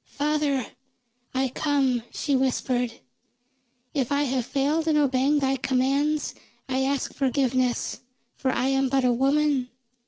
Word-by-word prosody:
"Father, 290 -3 0 0.7
I 265 0 +1
come," 270 -3 +1
she 285 -3 -1
whispered. 255 -2 0 1.0
"If 270 -4 -1
I 285 +1 +2
have 255 -3 -1
failed 295 +4 0
in 310 -1 +3
obeying 275 0 +3
thy 270 -1 +1
commands, 275 +4 0 0.3
I 265 0 0
ask 275 0 -1
forgiveness, 255 -2 0 0.3
for 260 - -1
I 255 +1 0
am 270 0 +2
but 265 -1 +2
a 245 - +4
woman. 275 0 +2
270 Hz, 130 wpm, -25 LUFS, 255-285 Hz, 1.0 s, a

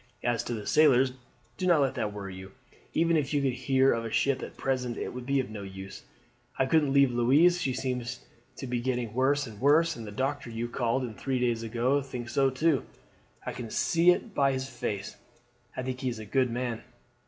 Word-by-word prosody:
As 120 -1 0
to 120 - -2
the 105 -2 -6
sailors, 135 -4 +4 0.5
do 185 - -1
not 170 -4 +5
let 135 -2 +1
that 105 - -2
worry 100 -2 -7
you. 95 +1 -10 0.4
Even 165 +1 +2
if 150 -1 0
you 145 - +2
could 135 -2 +1
hear 135 +1 +3
of 115 - -2
a 115 - -4
ship 135 +4 +1
at - - -8
present 125 -3 -1
it - - -3
would 125 0 -7
be 140 0 +2
of 130 -4 -3
no 105 -2 -6
use. 95 0 -8 0.6
I 130 - +3
couldn't 145 0 +3
leave 140 -2 +5
Louise; 145 +9 +4
she 135 -6 0
seems 125 -1 -3
to 130 - -18
me - - -25 0.3
to - - -6
be 120 -1 -1
getting 120 -3 -2
worse 140 +3 +2
and 110 -3 -11
worse, 160 +4 +4
and 115 -2 -8
the - - -7
doctor 135 +4 -2
you 115 +1 -3
called 120 +2 0
in 120 -3 -5
three 130 +4 -2
days 120 -2 0
ago 120 +5 +1
thinks 125 -3 -7
so 135 -1 +3
too. 140 +1 +1 0.6
I - - -2
can 120 -3 -6
see 170 +9 +3
it 195 +4 +2
by 140 -4 +2
his 130 0 -3
face. 105 -6 -5 0.6
I 130 - -2
think 130 0 -4
he 130 -1 -1
is 120 - -4
a 110 - -7
good 130 +4 +1
man. 120 -1 -3
130 Hz, 230 wpm, -28 LUFS, 120-140 Hz, 0.6 s, not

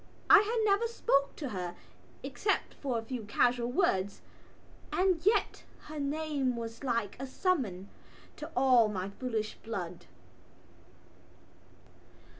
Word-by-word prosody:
I - - +11
had 430 +4 0
never 410 +3 +3
spoken 280 -11 +1
to 285 - -5
her, 180 -4 -4 0.5
except 405 - -1
for 260 -5 -2
a 225 - -3
few 245 +1 -5
casual 240 +3 +2
words, 200 - +1 0.7
and 365 -3 +2
yet 415 0 +2 0.2
her 305 0 -8
name 285 -3 -1
was 230 +1 -6
like 230 -6 -1
a 270 - -4
summons 255 - -1 0.5
to - - -7
all 250 -3 +5
my 195 -2 -3
foolish 220 -2 -3
blood. 180 -6 -6
250 Hz, 120 wpm, -31 LUFS, 215-310 Hz, 0.7 s, I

